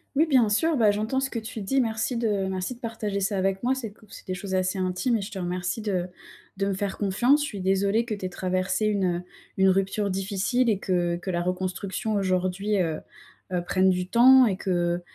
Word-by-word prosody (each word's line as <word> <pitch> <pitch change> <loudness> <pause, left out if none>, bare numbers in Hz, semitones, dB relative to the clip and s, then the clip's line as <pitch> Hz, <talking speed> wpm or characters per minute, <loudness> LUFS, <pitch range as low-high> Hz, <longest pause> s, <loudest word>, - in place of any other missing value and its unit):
Oui, 315 +3 +4
bien 255 -8 +4
sûr. 320 +9 +2
Bah, 215 -5 +4
j'entends 220 +6 -1
ce 270 - -1
que 230 - -3
tu 220 0 -7
dis. 270 +8 0
Merci 225 +1 -1
de 230 -1 0 0.2
merci 190 +6 -3
de 245 - -21
partager 210 -3 -3
ça 195 +1 0
avec 195 +2 0
moi. 255 +2 +2
C'est 230 -6 -5
qu - - -27
c'est - - -13
des 185 - -2
choses 190 +1 -5
assez 185 +1 0
intimes 185 +7 0
et 215 - 0
je 195 - -6
te 195 - -6
remercie 180 +4 -3
de 185 -4 -1 0.5
de 195 - 0
me 195 - 0
faire 195 +1 -3
confiance. 240 +9 +3
Je - - 0
suis 200 -8 -6
désolée 195 +4 +2
que 230 -2 -4
tu 200 -2 -5
aies - - -2
traversée 185 +3 -1
une, 200 -3 +1
heu, 175 0 0 0.3
une 190 0 +4
rupture 195 +2 +1
difficile 200 +6 0
et 200 -3 +1
que 175 -2 0
que 180 +2 -4
la 175 0 -1
reconstruction, 185 +4 -3
aujourd'hui, 190 +1 0
heu 160 -3 -1 0.5
heu, 175 -1 0
prenne 190 +1 +3
du 180 0 -1
temps 255 +2 +7
et 190 -4 0
que, 175 -2 0
195 Hz, 230 wpm, -26 LUFS, 185-225 Hz, 0.5 s, temps